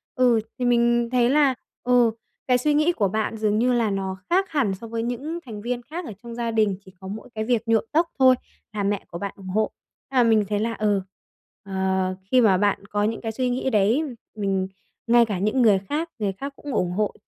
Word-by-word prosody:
ừ, 245 Hz, -3 st, +4 dB, 0.2 s
thì 250 Hz, -, 0 dB
mình 240 Hz, 0 st, +3 dB
thấy 245 Hz, -1 st, +3 dB
là, 280 Hz, -2 st, +4 dB, 0.3 s
ừ, 245 Hz, -2 st, +4 dB, 0.4 s
cái 250 Hz, -1 st, +4 dB
suy 295 Hz, +4 st, +1 dB
nghĩ 305 Hz, +3 st, +3 dB
của 215 Hz, -, +1 dB
bạn 220 Hz, +3 st, -2 dB
dường 215 Hz, -1 st, +1 dB
như 250 Hz, +1 st, +3 dB
là 230 Hz, -3 st, +2 dB
nó 190 Hz, -1 st, -3 dB
khác 380 Hz, +2 st, +2 dB
hẳn 265 Hz, -11 st, +1 dB
so 225 Hz, +4 st, -10 dB
với 230 Hz, 0 st, -3 dB
những 280 Hz, +8 st, -3 dB
thành 215 Hz, -3 st, -7 dB
viên 245 Hz, +1 st, -2 dB
khác 320 Hz, +7 st, -7 dB
ở -, -, -6 dB
trong 235 Hz, -1 st, -8 dB
gia 235 Hz, -1 st, -2 dB
đình, 215 Hz, -3 st, +2 dB
chỉ 190 Hz, -, -14 dB
có 190 Hz, -, -9 dB
mỗi 215 Hz, +5 st, -7 dB
cái 220 Hz, -, -1 dB
việc 235 Hz, -1 st, +1 dB
nhuộm 225 Hz, -1 st, +3 dB
tóc 335 Hz, +2 st, +2 dB
thôi 260 Hz, -1 st, +7 dB, 0.4 s
là 205 Hz, -1 st, -2 dB
mẹ 200 Hz, 0 st, -1 dB
của 170 Hz, -, -7 dB
bạn 200 Hz, +2 st, -4 dB
ủng 190 Hz, -, -11 dB
hộ. 215 Hz, +4 st, 0 dB, 0.4 s
Nhưng 260 Hz, -, -1 dB
mà 245 Hz, -, +6 dB
mình 220 Hz, -3 st, +4 dB
thấy 205 Hz, -1 st, 0 dB
là, 230 Hz, +1 st, -1 dB
ừ, 205 Hz, -3 st, +1 dB, 0.6 s
ờ, 190 Hz, -1 st, -1 dB, 0.2 s
khi 255 Hz, -, +6 dB
mà 200 Hz, -5 st, +5 dB
bạn 200 Hz, 0 st, +1 dB
có 205 Hz, 0 st, 0 dB
những 220 Hz, +2 st, -1 dB
cái 225 Hz, -1 st, -3 dB
suy 250 Hz, +2 st, -1 dB
nghĩ 255 Hz, +2 st, -1 dB
đấy, 220 Hz, +6 st, +3 dB, 0.3 s
mình 195 Hz, -3 st, -1 dB, 0.4 s
ngay 235 Hz, 0 st, +6 dB
cả 205 Hz, -5 st, -3 dB
những 215 Hz, +6 st, +1 dB
người 205 Hz, -4 st, +5 dB
khác, 300 Hz, -, -3 dB
người 205 Hz, -2 st, 0 dB
khác 275 Hz, +8 st, -6 dB
cũng 285 Hz, -3 st, -7 dB
ủng 180 Hz, -4 st, 0 dB
hộ 210 Hz, +3 st, 0 dB
225 Hz, 235 wpm, -24 LUFS, 205-250 Hz, 0.6 s, thôi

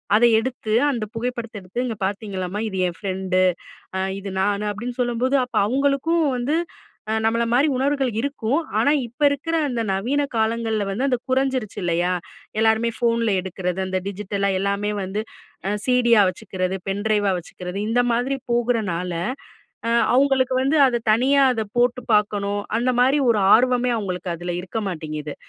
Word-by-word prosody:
அதை 235 Hz, +3 st, +6 dB
எடுத்து 235 Hz, -1 st, -3 dB, 0.2 s
அந்த 235 Hz, -5 st, -2 dB
புகைப்படத்த 235 Hz, -1 st, -4 dB
எடுத்து 190 Hz, +7 st, -4 dB
இங்க 235 Hz, -3 st, -3 dB
பார்த்தீங்களாமா? 195 Hz, -1 st, -3 dB
இது 190 Hz, -3 st, -4 dB
என் 175 Hz, -, -5 dB
ஃப்ரெண்டு, 190 Hz, -2 st, -1 dB, 0.8 s
இது 200 Hz, 0 st, -6 dB
நான். 200 Hz, +2 st, +1 dB
அப்படின்னு 235 Hz, +4 st, -5 dB
சொல்லும்போது, 245 Hz, +2 st, +1 dB
அப்ப 250 Hz, -, -8 dB
அவுங்களுக்கும் 280 Hz, +6 st, +1 dB
வந்து 255 Hz, +6 st, 0 dB, 0.6 s
அ -, -, +1 dB
நம்மள 230 Hz, +1 st, +2 dB
மாரி 270 Hz, +5 st, +4 dB
உணர்வுகள் 270 Hz, -1 st, +1 dB
இருக்கும். 275 Hz, -1 st, -1 dB, 0.2 s
ஆனா 285 Hz, -, +3 dB, 0.2 s
இப்ப 240 Hz, +6 st, -21 dB
இருக்கிற 285 Hz, +4 st, -2 dB
அந்த 240 Hz, -3 st, -1 dB
நவீன 250 Hz, +10 st, 0 dB
காலங்கள்ல 220 Hz, -1 st, 0 dB
வந்து 235 Hz, +8 st, -1 dB
அந்த 255 Hz, -2 st, +2 dB
குறைஞ்சிருச்சி 260 Hz, -5 st, 0 dB
இல்லையா. 175 Hz, +1 st, +1 dB, 0.5 s
எல்லாருமே 220 Hz, +1 st, +3 dB
ஃபோன்ல 230 Hz, -1 st, +1 dB
எடுக்கிறது, 180 Hz, 0 st, -3 dB
அந்த 185 Hz, 0 st, -1 dB
டிஜிட்டலா 200 Hz, 0 st, -2 dB
எல்லாமே 200 Hz, +1 st, -1 dB
வந்து 190 Hz, +3 st, -3 dB, 0.6 s
சிடியா 240 Hz, -3 st, +4 dB
வச்சுக்கறது, 185 Hz, -1 st, -3 dB
பென் 200 Hz, +1 st, -2 dB
டிரைவா 205 Hz, -2 st, +2 dB
வச்சுக்கறது. 180 Hz, +2 st, -8 dB
இந்த 245 Hz, +2 st, +3 dB
மாதிரி 255 Hz, +4 st, 0 dB
போகுறனால, 220 Hz, -8 st, 0 dB, 0.7 s
அ -, -, +1 dB, 0.3 s
அவுங்களுக்கு 265 Hz, -1 st, +3 dB
வந்து 280 Hz, +4 st, +2 dB
அத 240 Hz, -2 st, -1 dB
தனியா 270 Hz, +5 st, +4 dB
அத 220 Hz, -2 st, -2 dB
போட்டு 245 Hz, 0 st, +2 dB
பார்க்கணும். 205 Hz, -1 st, +1 dB, 0.2 s
அந்த 250 Hz, +2 st, +1 dB
மாரி 265 Hz, +4 st, +4 dB
ஒரு 215 Hz, -3 st, +1 dB
ஆர்வமே 250 Hz, +1 st, +3 dB
அவுங்களுக்கு 185 Hz, -4 st, -3 dB
அதில 175 Hz, +1 st, -4 dB
இருக்க 190 Hz, +5 st, -4 dB
மாட்டேங்குது. 155 Hz, -3 st, -5 dB
225 Hz, 150 wpm, -22 LUFS, 195-250 Hz, 0.8 s, அதை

